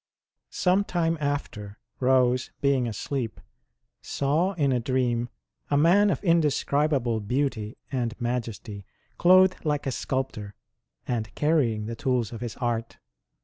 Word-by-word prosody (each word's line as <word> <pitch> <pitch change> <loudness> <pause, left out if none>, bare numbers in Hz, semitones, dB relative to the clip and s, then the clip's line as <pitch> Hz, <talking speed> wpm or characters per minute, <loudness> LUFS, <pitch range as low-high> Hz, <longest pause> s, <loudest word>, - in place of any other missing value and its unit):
Some 185 +2 +2
time 165 -4 0
after, 110 -8 -3 0.2
Rose, 125 -1 +2
being 135 -3 +2
asleep, 115 +1 -4 0.6
saw 155 +8 0
in 145 -7 +1
a 125 - +2
dream 120 -1 0 0.4
a 145 - +2
man 185 +7 +5
of - - -1
indescribable 145 - +2
beauty 110 -1 -2
and 120 -4 -2
majesty, 115 -4 -4 0.4
clothed 185 +1 +5
like 150 -3 -1
a 135 - -1
sculptor, 120 -7 -3 0.5
and 110 -4 -2
carrying 135 -9 +1
the 115 +1 -4
tools 120 -2 -1
of 115 - -7
his 120 -2 -5
art. 120 -2 -3
130 Hz, 125 wpm, -26 LUFS, 115-150 Hz, 0.6 s, man